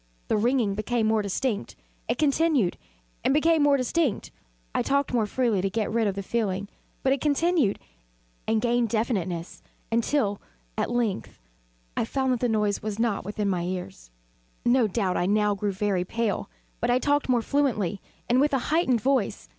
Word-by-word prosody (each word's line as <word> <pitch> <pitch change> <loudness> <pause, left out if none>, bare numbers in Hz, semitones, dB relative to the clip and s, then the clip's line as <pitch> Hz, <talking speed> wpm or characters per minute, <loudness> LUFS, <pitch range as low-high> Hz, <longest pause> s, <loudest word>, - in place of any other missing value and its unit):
The - - +3
ringing 235 -2 +2
became 220 +3 -1
more 220 0 +2
distinct: 205 - -2 0.3
It - - 0
continued 290 - +2 0.5
and 270 - +2
became 320 +1 +4
more 285 -1 +5
distinct: 270 0 0 0.4
I - - +1
talked 280 -1 0
more 225 -3 +2
freely 230 -4 +1
to 195 - 0
get 215 +2 -1
rid 225 -2 +2
of 195 - -1
the 200 - -4
feeling: 200 -2 -2 0.3
but 265 - +3
it 275 - -3
continued 300 - +2 0.7
and 220 0 +2
gained 240 -1 +2
definiteness 190 -7 -2 0.3
until, 230 -3 +1 0.3
at - - -1
length, 235 - -2 0.6
I - - 0
found 265 +2 0
that 245 - -1
the 245 - +1
noise 210 -2 +1
was 210 -1 -4
not 225 -3 0
within 205 +1 -2
my 185 -3 0
ears. 175 - -5 0.6
No 240 -1 +4
doubt 195 -3 0
I 175 - +1
now 210 +1 +2
grew 200 0 -1
very 195 -2 0
pale; 220 - -2 0.3
but - - 0
I 245 - +4
talked 290 +1 +1
more 240 -2 +3
fluently, 220 -10 0 0.3
and 250 +2 +3
with 290 0 +2
a 270 - +3
heightened 260 -9 +2
voice. 260 - 0
225 Hz, 175 wpm, -26 LUFS, 200-265 Hz, 0.7 s, more